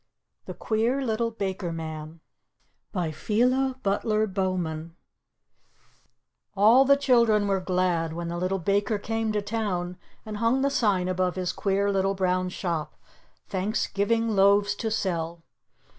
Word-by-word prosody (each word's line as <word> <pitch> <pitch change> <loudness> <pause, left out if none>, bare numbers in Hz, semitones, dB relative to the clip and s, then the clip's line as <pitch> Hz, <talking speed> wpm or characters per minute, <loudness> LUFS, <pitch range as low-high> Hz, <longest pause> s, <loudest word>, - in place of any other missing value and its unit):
THE - - -6
QUEER 235 +5 0
LITTLE 230 0 0
BAKER 190 -5 -3
MAN 160 0 -7 0.7
PHILA 225 - 0
BUTLER 215 +2 +1
BOWMAN 180 -5 -3 1.6
All 225 +7 +6
the 280 +1 +5
children 235 -6 +3
were 195 -1 +1
glad 180 -3 0
when 170 +1 -4
the 170 0 -4
Little 185 +2 0
Baker 200 +4 0
came 225 +1 -2
to 210 -1 -1
town 195 -5 -2 0.3
and 215 -1 -5
hung 230 +4 +2
the 280 - +2
sign 200 -8 +1
above 185 -1 0
his 185 -1 -2
queer 200 0 0
little 195 0 +1
brown 185 -1 0
shop, 170 -4 -3 0.5
"Thanksgiving 210 +3 0
Loaves 200 0 +4
to 225 - -2
Sell." 170 -5 -2
195 Hz, 130 wpm, -26 LUFS, 180-220 Hz, 1.6 s, All